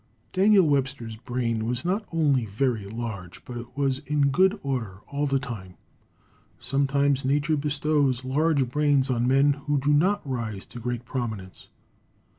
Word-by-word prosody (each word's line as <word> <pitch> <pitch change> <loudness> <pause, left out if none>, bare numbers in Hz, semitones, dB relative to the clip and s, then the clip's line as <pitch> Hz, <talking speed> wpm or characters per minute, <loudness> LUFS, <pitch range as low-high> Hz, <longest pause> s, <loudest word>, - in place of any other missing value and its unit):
Daniel 195 0 +5
Webster's 130 -5 -1
brain 115 -1 -2
was 125 +5 -2
not 200 +4 -1
only 145 -8 +2
very 110 0 -1
large, 100 -4 -6
but 125 - -8
it 120 +2 -9
was 135 -2 +1
in 145 0 +1
good 190 +8 +3
order 115 -8 -3
all 145 +1 -2
the 135 0 +2
time. 105 -9 -7 0.8
Sometimes 140 +2 +1
Nature 145 +4 +1
bestows 145 -3 0
large 140 0 +2
brains 145 -2 +2
on 120 0 +1
men 135 +2 +4
who 145 0 +2
do 145 +2 +2
not 180 +3 +2
rise 115 -6 -4
to 120 - -10
great 120 +1 -4
prominence. 110 -8 -5
135 Hz, 150 wpm, -26 LUFS, 120-145 Hz, 0.8 s, Daniel